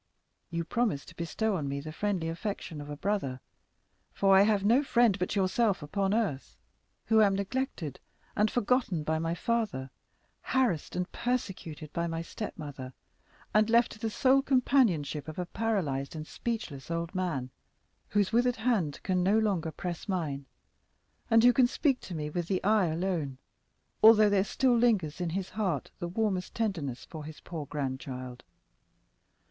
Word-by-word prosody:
You 170 -1 -2
promised 220 -9 -1
to 170 - -15
bestow 200 +6 -1
on 145 -6 -2
me 140 0 -2
the 155 +2 -7
friendly 185 0 -1
affection 165 -2 -4
of 145 - -9
a 145 - -5
brother. 150 -10 -1 0.7
For 195 -1 +4
I 190 - +8
have 205 -1 +3
no 235 +6 +5
friend 235 -7 +3
but 180 - -1
yourself 195 -1 +1
upon 195 +6 -1
earth, 205 -12 -1 0.5
who 220 -1 +5
am 200 -2 +4
neglected 200 - -3 0.4
and 210 +1 +3
forgotten 240 -8 +1
by 160 +1 0
my 165 +1 -1
father, 210 - -1 0.5
harassed 245 - 0
and 180 0 -2
persecuted 185 -11 -3
by 170 0 -1
my 165 0 -3
stepmother, 145 - -7 0.6
and 215 +1 +4
left 235 +1 +4
to 215 - -11
the 225 0 -1
sole 265 +5 +4
companionship 235 - +2
of 155 - -7
a 180 - -2
paralyzed 175 -10 -1
and 155 -1 -5
speechless 170 - -5
old 170 +1 -2
man, 160 -9 -2 0.6
whose 205 -2 +1
withered 245 +1 +3
hand 220 - 0
can 185 -1 +1
no 195 +4 +3
longer 190 -7 +1
press 175 +4 -5
mine, 145 -7 -2 0.8
and 225 -1 +6
who 245 0 +7
can 245 +1 +5
speak 270 0 +1
to 180 - -8
me 150 -1 -3
with 165 +2 -3
the 185 -1 -1
eye 210 -2 +4
alone, 160 -5 -2 0.6
although 215 -1 +8
there 195 -1 +4
still 250 +5 +2
lingers 205 -9 +2
in 175 - -1
his 185 +2 -3
heart 185 - -2
the 175 - -3
warmest 190 0 -1
tenderness 165 - -2
for 155 -2 -8
his 155 +1 -9
poor 160 -4 -6
grandchild. 130 -3 -5
185 Hz, 165 wpm, -30 LUFS, 155-220 Hz, 0.8 s, I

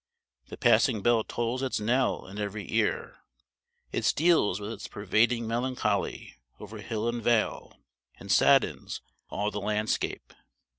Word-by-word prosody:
The - - -9
passing 115 -2 +3
bell 120 -2 +3
tolls 120 +3 -2
its 130 -4 -1
knell 125 +4 +1
in 100 +2 -9
every 105 -1 -5
ear; - - 0 0.7
it - - -2
steals 155 - +3
with 105 +1 -5
its - - -7
pervading 115 +4 +1
melancholy 125 +3 -2 0.2
over 105 +1 -9
hill 110 +1 -3
and 120 0 -2
vale, 115 -1 0 0.4
and - - -6
saddens - - +3 0.3
all 105 +1 -2
the 105 - -4
landscape. 105 +1 -2
110 Hz, 135 wpm, -28 LUFS, 105-120 Hz, 0.7 s, passing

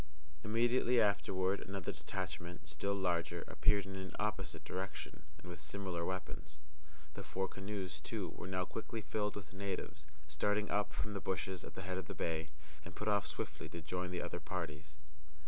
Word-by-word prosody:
Immediately 120 +2 +5
afterward 100 -2 +4
another 95 -2 -2
detachment, 85 0 -3
still 90 +7 +1
larger, 90 -4 +2
appeared 100 -2 +4
in 95 0 -4
an 95 -1 -4
opposite 95 -5 0
direction, 95 +1 -3 0.2
and 90 - -12
with 90 -3 -5
similar 85 +2 -1
weapons. 85 -4 -2 0.6
The - - -4
four 95 0 0
canoes, 95 -5 -3
too, 95 +2 -2
were 85 - -6
now 90 -1 +1
quickly 115 +2 -3
filled 105 0 +1
with 100 -2 -6
natives, 95 -5 -2 0.2
starting 105 +8 +2
up 105 0 +3
from 105 - -1
the 100 - -1
bushes 95 0 0
at - - -7
the 95 - -3
head 95 0 0
of - - -5
the - - -4
bay, 80 0 +1 0.3
and 85 - -8
put 105 - +1
off 100 -1 +4
swiftly - - -3
to 85 - -5
join 90 +3 -1
the 90 -1 0
other 85 0 -2
parties. 75 -2 -3
95 Hz, 175 wpm, -39 LUFS, 85-100 Hz, 0.6 s, Immediately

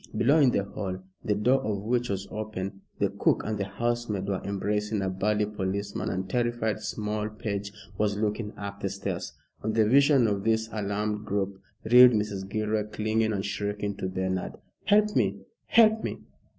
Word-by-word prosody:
Below, 145 +6 +4
in 140 -4 +6
the 100 - +1
hall, 95 -1 -4 0.3
the 105 - +1
door 125 +6 +3
of 105 -5 -2
which 120 +2 0
was 100 -1 -3
open, 100 -2 -5 0.2
the - - +1
cook - - +3
and 110 -1 -2
the 100 - 0
housemaid 115 -1 -2
were 100 -2 -1
embracing 105 +2 -1
a 95 - 0
burly 105 +3 +1
policeman, 100 0 -3
and 95 +1 -2
terrified 120 0 0
small 105 0 -2
page 100 -2 -4 0.3
was 105 -1 +1
looking 105 0 -1
up 100 0 -6
the 100 - -1
stairs. 95 -2 -4 0.3
On 110 - -1
the 110 -1 +4
vision 140 +1 +5
of 100 -3 0
this 110 0 +1
alarmed 105 0 -2
group 100 -1 -2 0.2
reeled 125 +2 +8
Mrs. 105 -3 -2
Gilroy, 110 0 0
clinging 110 +1 0
and 100 -1 -2
shrieking 100 0 -2
to 95 - -3
Bernard 95 0 -2 0.3
"Help 210 +1 +4
me 100 -4 +2 0.3
help 220 -1 +5
me! - - -3
105 Hz, 175 wpm, -27 LUFS, 100-110 Hz, 0.3 s, reeled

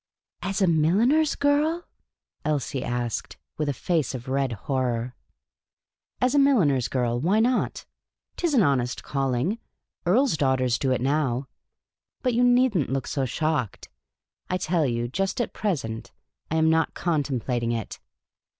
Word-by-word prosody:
"As 195 +1 -1
a - - +4
milliner's 210 - +3
girl? 300 +4 +1 0.3
" - - -51
Elsie 140 -3 -1
asked, 120 -2 -3 0.2
with 150 -2 0
a - - +2
face 160 -1 -1
of 125 0 -7
red 135 -1 0
horror. 125 -3 -1 0.5
" - - -65
As 255 - +3
a 290 - +4
milliner's 175 - +3
girl; 120 -2 0
why 185 - +2
not? 245 +3 0 0.5
'T 350 - 0
is 300 - 0
an 230 - +5
honest 125 -5 0
calling. 135 - -1 0.5
Earls' 235 - +3
daughters 130 -4 +1
do 135 - 0
it 125 - +1
now. 135 -2 0 0.8
But 250 -2 +1
you 240 +2 +3
need 245 -1 +4
n't 150 -8 +1
look 135 -1 -1
so 135 -2 -1
shocked. 145 -3 -2 0.6
I 185 - +1
tell 165 -4 +1
you, 120 -1 -1
just 195 - -2
at 240 - -1
present, 130 - -3 0.4
I 160 - -1
am 160 0 +4
not 160 0 +1
contemplating 130 -7 -1
it." 115 -3 -4
150 Hz, 155 wpm, -25 LUFS, 125-205 Hz, 0.8 s, an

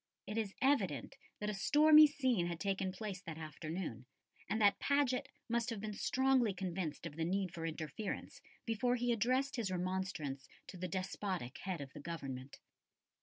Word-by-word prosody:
It 210 - -5
is 215 -3 -1
evident 195 - +2 0.2
that 210 0 -1
a - - -4
stormy 305 +8 +8
scene 255 -11 +1
had 170 -1 -4
taken 195 -1 0
place 190 -1 -5
that 165 -4 -7
afternoon, 155 -5 -5 0.4
and 220 - +1
that 205 -2 +5
Paget 280 -3 +2 0.2
must 235 0 0
have 225 -3 -3
been 210 +1 -4
strongly 255 -2 +2
convinced 180 -4 -3
of 160 -2 -6
the 165 - 0
need 185 +1 0
for 165 -2 -3
interference 160 +5 -5 0.2
before 245 +2 +1
he 245 0 +1
addressed 255 +5 +1
his 225 -5 0
remonstrance 180 -7 -2 0.2
to 185 - -8
the 185 +1 -3
despotic 185 -5 -3
head 180 -5 -3
of 140 -1 -8
the - - -8
Government. 140 -4 -6
190 Hz, 170 wpm, -36 LUFS, 165-230 Hz, 0.4 s, stormy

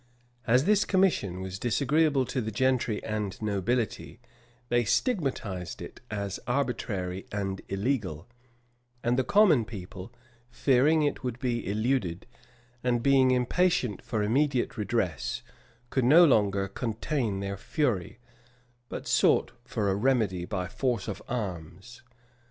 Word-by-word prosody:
[*] 120 0 -33
As 125 +4 +4
this 210 0 +4
commission 165 - +1
was 95 0 -6
disagreeable 140 +4 +2
to 130 +1 -2
the 110 - -3
gentry 120 -1 0
and 105 -3 -3
nobility, 110 +2 -2 0.5
they 120 0 +3
stigmatized 115 - -1
it - - -9
as 100 -2 -3
arbitrary 105 -8 -2
and 95 -2 -3
illegal; 95 - -2 0.8
and 120 +1 +2
the 130 - +2
common 200 - +5
people, 95 -3 -9 0.4
fearing 140 +5 +3
it 145 -2 -1
would 125 -2 -3
be 120 -6 -2
eluded, 105 -4 -1 0.6
and 120 -2 +1
being 135 -2 +5
impatient 130 - +1
for 110 -2 -2
immediate 130 +3 +1
redress, 105 -5 -2 0.5
could 130 -3 +1
no 160 +7 +8
longer 100 -8 +2
contain 115 +1 -2
their 100 0 -3
fury, 110 - -1 0.7
but - - -6
sought - - +3
for 110 -5 -1
a - - +1
remedy 105 -6 +1
by 90 -2 -3
force 125 +6 -2
of - - -5
arms. 95 0 -6
120 Hz, 130 wpm, -28 LUFS, 100-130 Hz, 0.8 s, no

